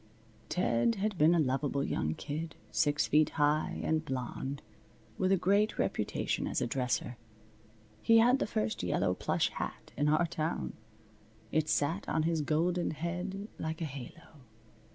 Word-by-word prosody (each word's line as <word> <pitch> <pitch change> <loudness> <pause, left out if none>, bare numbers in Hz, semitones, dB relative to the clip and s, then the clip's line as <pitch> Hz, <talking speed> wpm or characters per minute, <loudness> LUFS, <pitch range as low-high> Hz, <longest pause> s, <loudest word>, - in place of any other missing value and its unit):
Ted 120 - +2
had 210 0 -1
been 160 +3 +6
a - - +3
lovable 140 0 0
young 80 - -1
kid, 160 +2 -5 0.2
six 145 0 +2
feet 155 +1 +4
high, 150 +1 +2
and 160 -1 +1
blonde, 135 0 -4 0.6
with 185 0 +2
a 195 - +5
great 200 +4 +2
reputation - - -1
as - - -1
a - - 0
dresser. 125 -1 -1 0.8
He 230 - +5
had 245 +4 +5
the - - 0
first 110 - -1
yellow - - +1
plush - - 0
hat - - -6
in 145 +1 +2
our 155 +3 +4
town. 160 0 -2 0.8
It 155 0 +1
sat 160 +7 0
on 160 - +1
his 165 -1 +1
golden 170 +4 +1
head 180 +5 -4
like 160 0 -3
a 165 - -2
halo. 145 +3 -10
155 Hz, 155 wpm, -32 LUFS, 145-175 Hz, 0.8 s, been